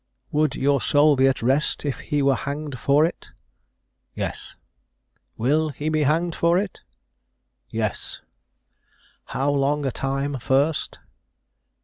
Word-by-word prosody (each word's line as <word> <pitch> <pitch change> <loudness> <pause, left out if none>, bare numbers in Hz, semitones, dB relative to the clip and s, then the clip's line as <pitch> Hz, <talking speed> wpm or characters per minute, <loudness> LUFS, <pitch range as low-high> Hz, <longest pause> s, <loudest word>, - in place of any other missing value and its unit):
"Would 150 -2 +1
your 140 -1 +2
soul 145 0 +4
be 135 0 +4
at 130 -3 0
rest 135 +5 +1
if 140 - -2
he 145 -2 -1
were 135 0 +4
hanged 140 +1 -4
for 140 +5 +4
it?" 170 - -5 0.9
"Yes." - - -5 0.8
"Will 150 +7 +2
he 145 +2 -3
be 155 0 +1
hanged 165 +4 +1
for 170 +2 +2
it?" 195 0 -3 0.9
"Yes." 110 -3 -3 1.1
"How 140 +2 -1
long 145 +1 +1
a 135 - 0
time 135 +2 -2
first?" 140 +5 0
145 Hz, 125 wpm, -23 LUFS, 135-155 Hz, 1.1 s, soul